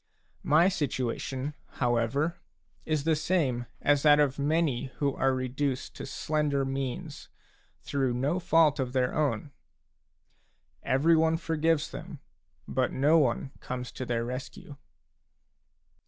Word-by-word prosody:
My 155 +4 +4
situation, 135 -3 -2 0.2
however, 125 +7 0 0.5
is 155 -3 0
the 160 0 +2
same 145 -7 0 0.2
as 145 -1 +3
that 150 0 +6
of 145 -1 +2
many 150 -3 +1
who 140 -2 0
are 135 - +1
reduced 130 +1 -2
to - - -7
slender 150 -3 0
means 135 -2 -4 0.5
through 135 -4 0
no 140 +8 0
fault 165 -4 +3
of 130 -2 -2
their 125 -1 +1
own: 150 0 -1 1.3
every 155 +6 +3
one 160 0 +3
forgives 160 -2 0
them, - - -8 0.5
but 130 -1 0
no 150 +5 +4
one 135 -1 0
comes 125 -1 -5
to - - -6
their 120 -2 -1
rescue. 130 +3 -7
140 Hz, 125 wpm, -28 LUFS, 130-155 Hz, 1.3 s, that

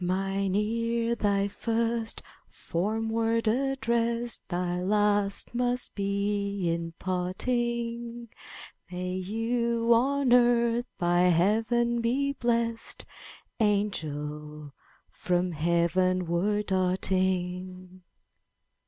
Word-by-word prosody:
''Mine 195 +1 0
ear 230 +2 0
thy 200 -3 +1
first 230 +2 -1 0.3
formed 220 +6 -2
word 230 0 +1
addressed; 235 -2 0
Thy 180 0 -1
last 205 +1 +1
must 245 +1 -1
be 200 -1 -1
in 165 0 -4
parting. 235 +5 -2 0.6
May 180 0 -3
you 230 +4 +1
on 265 +2 +3
earth 240 0 +3
by 175 0 +2
Heaven 225 +7 +2
be 275 +4 +1
blessed. 235 -2 -1 0.5
Angel, 150 -8 -2 0.4
from 180 0 0
Heavenward 175 +4 +1
darting!' 185 -1 -1
205 Hz, 80 wpm, -28 LUFS, 185-235 Hz, 0.6 s, on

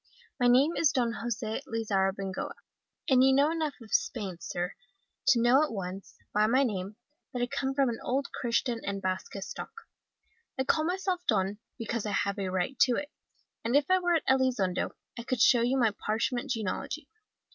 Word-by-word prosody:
My 245 - +4
name 270 +7 +5
is 310 -3 +3
Don 240 -4 +1
Jose 225 -1 -3
Lizzarrabengoa, 195 -3 -1 0.5
and 260 -1 +5
you 265 - +6
know 285 +3 +4
enough 315 -3 -2
of 220 - -11
Spain, 210 - 0
sir, 175 +1 -3 0.5
to 240 - +6
know 240 +4 +5
at 305 - -2
once, 195 -2 -6 0.2
by 210 +1 +4
my 260 +5 +4
name, 200 -4 -3 0.4
that 245 -3 -2
I - - +3
come 270 +1 -2
of 270 0 +2
an 235 -2 -2
old 270 +3 -1
Christian 235 0 -1
and 200 0 -2
Basque 185 +1 -3
stock. 460 - -8 0.8
I 265 - +1
call 310 +3 +2
myself 365 +1 -1
Don, 200 -1 +1 0.2
because 230 -2 -3
I 205 - -2
have 200 +1 0
a 190 -1 -1
right 185 +8 -2
to 250 -2 +5
it, 290 +3 -4 0.5
and 235 +3 0
if 290 +4 +3
I 370 - +5
were 350 -1 +2
at 325 - 0
Elizondo 250 -9 +2 0.3
I - - -5
could 255 0 -2
show 240 +1 +6
you 250 +3 +2
my 230 -4 +3
parchment 240 +6 -2
genealogy. 235 - -3
240 Hz, 185 wpm, -29 LUFS, 205-270 Hz, 0.8 s, you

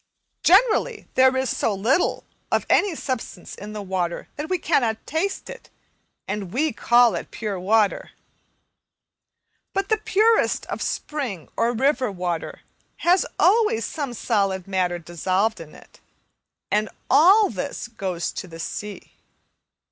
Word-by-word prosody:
Generally, 445 +4 +3
there 260 0 +4
is 260 -1 0
so 210 - 0
little 235 - +1 0.3
of - - +1
any 400 -5 +3
substance 255 - -5
in 210 +1 -8
the 210 -1 -5
water 185 -3 -3
that 300 +2 -5
we 370 - +1
cannot 240 -10 0
taste 365 +7 -2
it, - - -10 0.6
and 200 -4 -4
we 300 +5 0
call 240 +1 +4
it - - -5
pure 210 -4 -4
water; 210 +2 +1 1.6
but 390 0 -1
the 435 -1 +2
purest 435 +2 +2
of - - -5
spring 250 - -4
or 230 +1 +2
river 260 -1 +1
water 180 -3 -4 0.4
has 355 +1 +4
always 440 +5 +3
some 280 -6 -4
solid 195 -5 0
matter 185 -2 0
dissolved 185 +6 -1
in 160 -2 -11
it, - - -18 0.7
and 210 +1 +1 0.2
all 390 +5 +6
this 200 +3 -5
goes 190 -7 -3
to 190 - -6
the 165 -1 -11
sea. 205 +5 -6
230 Hz, 135 wpm, -23 LUFS, 190-315 Hz, 1.6 s, all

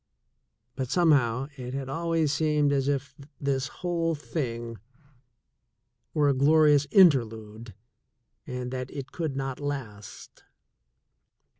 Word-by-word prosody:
but, 130 -2 -3
somehow, 135 -7 +2
it 125 0 -6
had 135 -1 -4
always 165 +1 0
seemed 150 -2 +2
as 135 -1 0
if 140 0 -1 0.3
this 140 -1 -1
whole 165 0 -2
thing 120 - -5 1.4
were 150 -2 +3
a 140 - +4
glorious 145 +1 +4
interlude 115 - +2 0.7
and 125 -1 -5
that 130 0 -4
it 140 -2 -7
could 160 -5 -3
not 135 -1 -4
last. 120 -8 -7
140 Hz, 110 wpm, -27 LUFS, 125-150 Hz, 1.4 s, a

